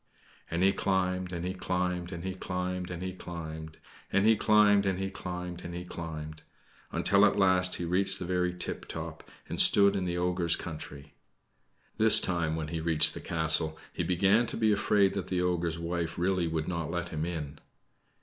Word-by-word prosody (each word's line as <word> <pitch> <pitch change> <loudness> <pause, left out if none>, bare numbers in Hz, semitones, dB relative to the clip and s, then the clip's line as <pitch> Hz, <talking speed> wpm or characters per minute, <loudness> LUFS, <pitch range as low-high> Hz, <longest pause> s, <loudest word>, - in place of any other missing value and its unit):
And 85 +2 -1
he 95 0 +4
climbed, 95 -1 -1
and 85 -1 -4
he 90 - -2
climbed, 90 -1 -2
and 85 -2 -6
he 95 0 -3
climbed, 90 -1 -4
and 90 0 -6
he 95 0 -4
climbed, 80 -3 -8 0.3
and 100 +1 +2
he 110 0 +6
climbed, 105 -2 +4
and 95 -1 0
he 95 0 -3
climbed, 90 -1 -6
and 85 0 -7
he 90 0 -6
climbed 80 -3 -7 0.5
until 100 +2 +3
at 105 - +4
last 95 -2 +3
he 85 - -4
reached 90 +3 +3
the 90 - -5
very 90 0 0
tiptop, 90 - -6 0.2
and - - +2
stood 100 -1 +6
in 95 -2 -1
the 90 -1 -2
ogre's 90 -1 +1
country. 75 -3 -8 0.9
This 110 0 +7
time 85 -3 -1
when 80 -1 -4
he 85 0 -3
reached 80 -1 +3
the - - -7
castle 80 -1 +1 0.2
he - - -3
began 100 +6 +2
to - - -3
be 110 -1 +2
afraid 100 -1 +2
that 100 -2 -4
the 90 -1 -1
ogre's 85 -2 -1
wife 85 0 -3
really 90 -1 0
would 80 -1 -2
not 85 -3 -3
let 85 0 -3
him 80 -1 -3
in. 80 -4 -5
90 Hz, 190 wpm, -29 LUFS, 85-95 Hz, 0.9 s, This